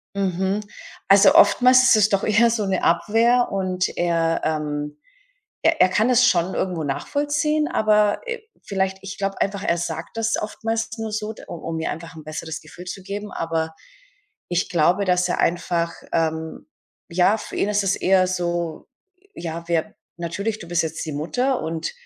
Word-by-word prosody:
Mhm, 190 +1 0 0.5
also, 195 0 +6
oftmals 255 0 +6
ist 245 - +6
es 215 -1 +4
doch 200 -2 0
eher 215 +2 +4
so 220 -3 -1
'ne 190 -1 0
Abwehr 225 +9 +3
und 185 -1 -1
er 165 -1 +1
ähm, 150 -1 -3 0.6
er 325 -1 +3
er 185 - +6
kann 215 +6 +2
es 250 0 +5
schon 180 -4 +2
irgendwo 180 -4 -2
nachvollziehen, 290 - 0
aber, 210 -3 +2
äh, 470 -1 -4 0.2
vielleicht 190 -1 -1
ich 195 0 -8
glaube 195 0 -3
einfach, 200 0 -1
er 170 - +1
sagt 170 +3 -5
das 225 0 0
oftmals 225 +1 -3
nur 225 -1 -4
so, 215 +1 -3 0.2
u - - -5
um 165 0 -5
mir 160 - -2
einfach 165 0 -8
'n 155 - -10
besseres 155 +1 -6
Gefühl 180 - -12
zu 185 +1 -7
geben, 205 +2 -6
aber 160 -1 -2 0.7
ich 175 0 0
glaube, 175 +3 +2
dass 180 0 +2
er - - -1
einfach 170 -1 0 0.2
ähm, 160 -1 -2 0.4
ja, 185 +5 +3
für - - -8
ihn 205 - +1
ist 205 -1 +1
es 195 -1 +1
eher 185 0 +3
so: 175 -3 -3 0.5
„Ja, 170 0 -6
wir 165 -2 -1 0.2
natürlich, 200 +6 -3
du 175 - -10
bist 175 0 +1
jetzt 160 +1 -4
die 155 - -4
Mutter.“ 245 - -1
Und 160 0 -3
185 Hz, 175 wpm, -22 LUFS, 165-215 Hz, 0.7 s, also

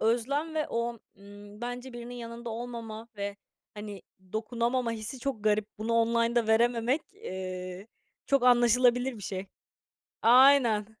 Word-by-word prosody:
özlem 270 +8 0
ve 310 -1 0
o, 235 0 -2 0.2
ımm, 205 +1 -13
bence 245 +1 -5
birinin 240 0 -8
yanında 235 0 -7
olmama 230 -1 -6
ve, 200 0 -4 0.4
hani, 205 -2 -8 0.3
dokunamama 235 +2 -1
hissi 225 +4 -5
çok 245 -4 -4
garip. 210 -1 +2
Bunu 220 +2 -2
online'da 230 0 +2
verememek, 235 +5 +2
eee, 185 - -6 0.4
çok 275 -2 +3
anlaşılabilir 245 +1 +4
bir 205 - -10
şey. 190 0 -4 0.8
Aynen. 245 -3 +6
235 Hz, 125 wpm, -29 LUFS, 215-245 Hz, 0.8 s, Aynen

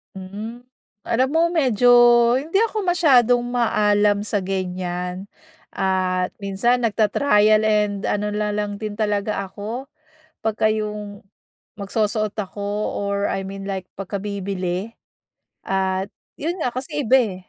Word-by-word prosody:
Hmm. 210 +6 -7 0.5
Alam 255 +3 +2
mo 325 - +3
medyo, 255 -8 +2 0.5
hindi 330 +9 0
ako 435 -3 -1
masyadong 250 -9 +4
maalam 210 -4 +2
sa 210 0 -1
ganyan, 180 0 -3 0.5
at 185 -1 0
minsan 230 +5 +1
nagta-trial 215 0 +3
and 210 -2 +1
ano 210 0 0
na 210 0 -1
lang 205 -1 -2
din 215 -1 -5
talaga 205 -1 -1
ako, 230 +8 -6 0.5
pagka-yong 210 -2 -1 0.6
magsusuot 215 +1 -1
ako 205 -1 -5 0.4
or 200 0 -1
I 195 0 -3
mean 195 0 -6
like 190 -1 -4
pagkabibili, 195 0 -4 0.7
at 190 0 0 0.3
'yon 335 +4 -2
nga 245 - 0
kasi 290 +3 -3
iba, 260 +3 +5
eh. 210 -6 -1
210 Hz, 115 wpm, -22 LUFS, 195-230 Hz, 0.7 s, iba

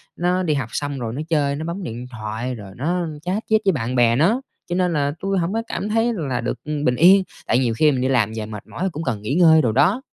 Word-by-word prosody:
nó 180 +1 0
đi 155 -3 +1
học 130 -6 -2
xong 145 -2 -3
rồi 115 -1 -4
nó 145 - -4
chơi, 145 -3 +1
nó 155 +2 -5
bấm 175 +3 -4
điện 120 -1 -6
thoại 115 +2 -4
rồi 100 -3 -10
nó 170 +6 -1
chat 190 +6 -2
chít 220 0 +3
với 195 - +5
bạn 130 -4 -2
bè 120 -1 +4
nó, 200 - +2 0.3
cho 175 - -1
nên 180 -2 +1
là 145 -1 0
tui 195 0 -1
hổng 175 +3 -1
có 225 - 0
cảm 210 - -3
thấy 225 +2 +1
là 135 - -2
được 120 0 -3
bình 145 -4 0
yên, 185 +6 +6 0.2
tại 125 - +3
nhiều 120 -3 +1
khi 150 -1 +5
mình 130 -2 -1
đi 130 - +1
làm 110 -5 +2
về 110 -1 -4
mệt 105 -2 -9
mỏi 190 +1 -3
cũng 160 +2 -5
cần 115 -7 -2
nghỉ 130 +8 -2
ngơi 160 -3 +6
đồ 115 - +1
đó. 145 - +3
145 Hz, 270 wpm, -21 LUFS, 125-180 Hz, 0.3 s, yên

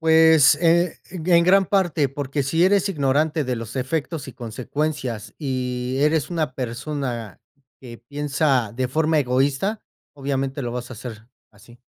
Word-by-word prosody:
Pues, 160 -2 +6
eh, 170 0 +3
ge 175 -1 +2
en 170 - +4
gran 195 +2 +5
parte, 175 -7 +1
porque 140 0 -2
si 160 +6 +2
eres 200 +1 +3
ignorante 150 0 +1
de 125 -1 -2
los 115 +2 -7
efectos 145 +2 -3
y 130 - -8
consecuencias 125 -2 -4
y 125 -2 -2
eres 150 -1 +2
una 160 -7 -2
persona 125 -3 -4 0.4
que 120 -3 -10
piensa 140 -3 0
de 130 0 -1
forma 155 +3 +1
egoísta, 140 - 0 0.3
obviamente 135 -1 -3
lo 120 -2 -3
vas 125 0 -5
a - - -6
hacer 110 -1 -9 0.2
así. 115 +4 -18
140 Hz, 150 wpm, -22 LUFS, 125-160 Hz, 0.4 s, Pues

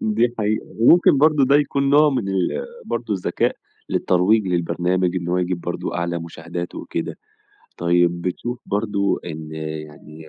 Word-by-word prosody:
دي 165 - +1
حقيقة، 110 0 -1
وممكن 145 +4 +6
برضه 150 -1 +4
ده 140 +2 +5
يكُون 140 -1 +1
نوع 150 +1 +6
من 125 -8 -1
ال 95 -2 0 0.3
برضه - - -2
الذكاء - - -1 0.3
للترويج 95 +3 +2
للبرنامج، 90 +1 0
إن 85 -1 -3
هو 90 - +1
يجيب 90 -1 -1
برضه 85 - -4
أعلى 85 0 -1
مشاهدات 85 +1 -6
وكده، - - -5 0.6
طيب 85 0 +2
بتشوف 120 +7 -3
برضه 100 -1 0
إن 80 -2 -7
يعني 80 0 -8
90 Hz, 145 wpm, -21 LUFS, 85-120 Hz, 0.6 s, وممكن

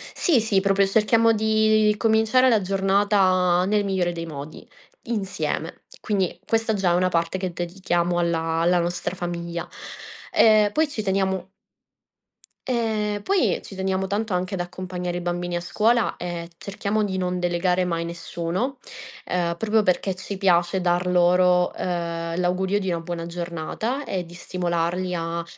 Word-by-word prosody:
Sì, 290 - +3
sì, 210 -3 +2
proprio 195 0 +2
cerchiamo 225 +2 +3
di 215 0 +3
cominciare 225 +4 +3
la 220 -3 +3
giornata 190 -2 +2
nel 205 0 +1
migliore 185 -3 0
dei 165 -1 -5
modi, 150 -1 -9 0.4
insieme. 185 -7 -3 0.2
Quindi, 190 -5 -1
questa 225 -1 +1
già 190 -3 +1
è - - +3
una 185 +1 +2
parte 170 +1 0
che 185 -2 -3
dedichiamo 175 0 -1
alla 165 -1 0
alla 175 +1 +3
nostra 175 +1 -2
famiglia. 170 -1 -4 0.6
Ehm, 215 -2 +5
poi 310 +3 +1
ci 220 -7 -4
teniamo 190 -1 -1 1.2
ehm, 215 -4 -1
poi 390 -2 +2
ci 195 - -11
teniamo 190 0 -1
tanto 210 +1 -2
anche 180 +1 -1
ad 185 - -1
accompagnare 180 0 -5
i - - -4
bambini 175 0 -2
a 175 - -4
scuola, 225 +6 +1
e 175 -1 -5
cerchiamo 200 +2 -2
di 190 -2 -2
non 180 0 -1
delegare 180 +1 +1
mai 170 -1 -2
nessuno, 170 +8 -3 0.5
ehm, 170 -1 -1
proprio 220 +2 +2
perché 185 0 0
ci 190 +1 -6
piace 175 -1 +2
dar 180 0 +1
loro, 180 0 +3
ehm, 170 -1 -3
l'augurio 185 +3 +1
di 190 - -4
una 170 -1 -1
buona 170 0 -5
giornata 175 - -4
e 185 -2 -3
di 170 - -13
stimolarli 180 0 -2
a, 170 0 -3
185 Hz, 150 wpm, -24 LUFS, 175-205 Hz, 1.2 s, Ehm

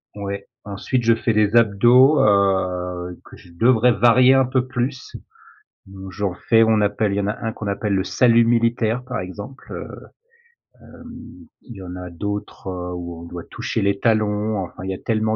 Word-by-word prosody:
ouais. 100 -1 -6 0.2
Ensuite 105 +5 -3
je 115 0 +4
fais 115 0 -1
les 105 +1 +2
abdos, 120 +6 +5
heu, 90 -3 0
que - - -14
je 90 - -18
devrais 120 +5 +3
varier 120 +4 +5
un 135 0 +4
peu 130 0 0
plus. 130 0 -4 0.7
Mmh, 95 0 -10
j'en 100 -1 -2
fais 115 +4 +2
on 110 -1 +2
appelle 105 0 0
il - - -2
y - - 0
en 100 - -2
a 105 - -2
un 115 -1 -2
qu'on 110 - -8
appelle 100 0 -2
le 95 -1 0
salut 115 +2 +3
militaire, 115 0 +1
par 125 -4 -4
exemple. 100 +8 -9
Heu, - - -6 1.0
hem, - - -14 0.5
il 120 - -12
y - - -9
en 90 0 -8
a 90 0 -7
d'autres, 100 +3 -6
heu, 90 -1 -5
où 85 -1 -7
on - - -10
doit 85 0 -8
toucher - - -3
les 100 0 0
talons. 105 -1 0
Enfin, 90 - -10
il 95 - -4
y - - -2
a - - -6
tellement 110 -1 -1
105 Hz, 195 wpm, -21 LUFS, 95-115 Hz, 1.0 s, abdos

